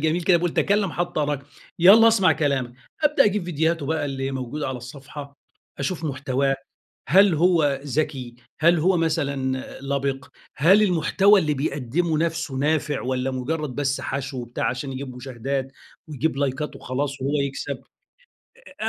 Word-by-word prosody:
جميل 160 +3 +1
كده 180 0 +4
بيقول 175 -1 -1
تَكلَّم 200 -3 +1
حتّى 175 -3 -2
أراك. 145 -2 -1 0.4
يالّا 210 +6 +8
أسمع 205 -5 +4
كلامك. 135 -5 -1 0.3
أبدأ 300 -2 +4
أجيب 205 -3 +1
فيديوهاته 160 -2 0
بقى 160 0 -1
اللي 135 -1 -3
موجودة 135 +2 -4
على 130 - -3
الصفحة، 140 +3 -10 0.4
أشوف 165 +4 -3
محتواه، 135 -1 0 0.5
هل 195 -1 +6
هو 160 -4 +3
ذكي؟ 135 -4 -2 0.2
هل 170 +1 +4
هو 180 +3 +3
مثلًا 140 -5 -1 0.2
لَبِق؟ 140 0 -2 0.3
هل 185 +9 +5
المحتوى 195 +3 +4
اللي 150 -3 0
بيقدّمه 145 +3 -1
نفسه 165 -3 -2
نافع 145 +1 0
والّا 130 +1 -1
مُجرّد 135 +1 -3
بس 140 0 -1
حَشْو 135 0 -4
وبتاع 120 0 -2
عشان 130 +2 -4
يجيب 130 -1 -6
مشاهدات، 130 +1 -3 0.4
ويجيب 150 0 -2
لايكات 140 +2 -2
وخلاص 140 +1 -4
وهو 140 +3 0
يكسب. 140 -1 -4 1.0
أ 220 - 0
145 Hz, 145 wpm, -23 LUFS, 135-165 Hz, 1.0 s, يالّا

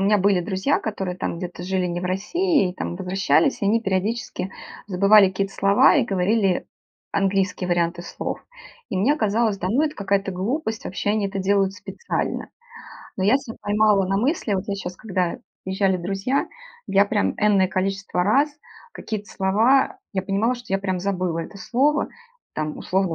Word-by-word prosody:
меня 205 +2 +4
были 195 -1 +3
друзья, 190 +10 0
которые 190 -4 -4
там - - -2
где-то 175 0 -6
жили 185 0 -1
не 175 0 -2
в 180 - -5
России, 210 - +1
и, - - -11
там, 175 - -4
возвращались, 180 -4 +1
и 200 - 0
они 225 +3 +2
периодически 195 0 -2 0.4
забывали 200 +2 +6
какие-то 195 +1 -2
слова 200 +11 +5
и 265 - +3
говорили 195 0 +1 0.5
английские 195 -2 0
варианты 175 0 0
слов. - - -5 0.5
И - - -3
мне 235 +10 +3
казалось: 215 -2 +1
да 185 - -2
ну, 255 +9 +2
это 305 -1 -1
какая-то 200 -1 -1
глупость, 220 - -2
вообще 190 +2 -2
они 210 -2 0
это 195 - -4
делают 195 0 +2
специально. 470 - -4 0.7
Но 190 - -2
я 220 +7 +5
ся 250 -5 -8
поймала 205 -2 +3
на 195 +1 0
мысли, 245 - 0
вот 190 0 -1
я 200 - -1
щас, 180 -2 -6
когда 185 -5 -2 0.3
приезжали 190 0 +1
друзья, 195 +9 -1 0.4
я 200 +1 +4
прям 205 0 +1
энное 200 -3 +3
количество 195 -1 -1
раз 275 +9 +3 0.4
какие-то 210 -2 -5
слова, 225 - +2
я 190 -2 -1
понимала, 200 +6 +1
что 245 0 -9
я 195 - +2
прям 185 -2 -2
забыла 185 -3 -1
это 185 +4 -7
слово. 280 +8 +1 0.4
Там, 155 0 -3
условно, 190 -2 0
195 Hz, 170 wpm, -23 LUFS, 185-215 Hz, 0.7 s, забывали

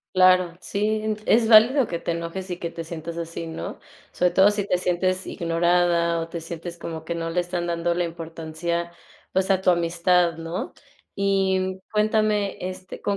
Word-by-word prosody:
Claro. 185 -2 +4
Sí, 205 +2 -2 0.2
n 215 -1 -1
es 225 0 +3
válido 235 +4 +7
que 170 - -3
te - - -4
enojes 170 +3 -4
y 175 - -3
que 170 - -3
te 165 -1 -7
sientas 165 0 -7
así, 165 0 -5
¿no? 160 - -6 0.3
Sobre 180 0 +2
todo 190 +3 +5
si 205 -1 -2
te 180 - +2
sientes 185 +1 0
ignorada 170 0 +1
o 165 - -4
te 165 -1 -6
sientes 170 +1 -7
como 165 -2 -6
que 170 - -2
no 165 0 -3
le 180 +1 +1
están 175 0 -3
dando 170 0 0
la 175 0 0
importancia, 165 +1 -4 0.4
pues 190 +1 +1
a 190 -1 +3
tu 185 - +4
amistad, 170 0 +2
¿no? 165 +2 -5 0.4
Y, 195 -1 +2
mm, 185 0 -3
cuéntame, 210 -1 +1
este, 185 0 -7
¿con 200 - -1
175 Hz, 185 wpm, -24 LUFS, 170-190 Hz, 0.4 s, válido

